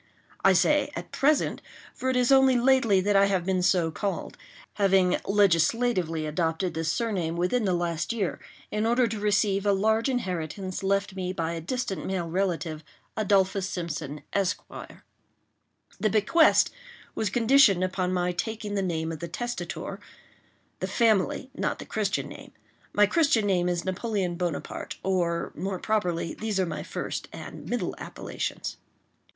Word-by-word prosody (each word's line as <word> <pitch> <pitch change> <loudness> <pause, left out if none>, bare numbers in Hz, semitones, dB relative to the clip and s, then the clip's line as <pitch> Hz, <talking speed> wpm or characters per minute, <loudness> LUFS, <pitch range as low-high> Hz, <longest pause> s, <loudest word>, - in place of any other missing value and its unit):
I 195 - +6
say 290 +9 +3
"at - - -7
present;" 295 +2 +1 0.3
for 260 - -2
it 260 - +1
is 250 +1 +3
only 265 -1 +6
lately 240 -6 +4
that 205 +2 +1
I 195 0 +6
have 190 -3 0
been 185 -1 +1
so 175 -2 +2
called—having 195 0 -1
legislatively 185 -3 +2
adopted 165 +3 -1
this 160 -1 -1
surname 185 -8 -1
within 210 +7 +1
the 185 -2 +2
last 170 0 -1
year 210 -6 -2 0.3
in 210 +1 0
order 240 +2 +3
to 220 -2 -3
receive 200 -1 +2
a 205 - +3
large 220 +5 +2
inheritance 185 - -3
left 195 0 0
me 185 -1 -3
by 165 -2 -2
a 165 - -4
distant 195 +2 -3
male 185 -3 -2
relative, 170 -3 -2 0.3
Adolphus 195 -2 +2
Simpson, 150 -5 -5
Esq. 195 -2 +1 1.4
The 215 - +2
bequest 220 - +4 0.4
was 215 - -1
conditioned 230 -4 +5
upon 185 0 -1
my 180 -1 0
taking 210 +4 -4
the 200 - 0
name 165 -3 -2
of 160 - -6
the 170 - -5
testator,—the 240 +8 -7
family, 230 +3 +1
not - - -2
the - - -8
Christian - - -1
name; - - -11 0.4
my 205 - +5
Christian 245 -3 +2
name 180 -3 +2
is 175 -1 -2
Napoleon 190 -1 -1
Bonaparte—or, 170 +1 -2
more 190 +3 -3
properly, 180 -6 -1
these 215 -3 -2
are 190 - +2
my 155 -3 -4
first - - -5
and - - -9
middle - - -1
appellations. - - -5
195 Hz, 145 wpm, -27 LUFS, 175-220 Hz, 1.4 s, I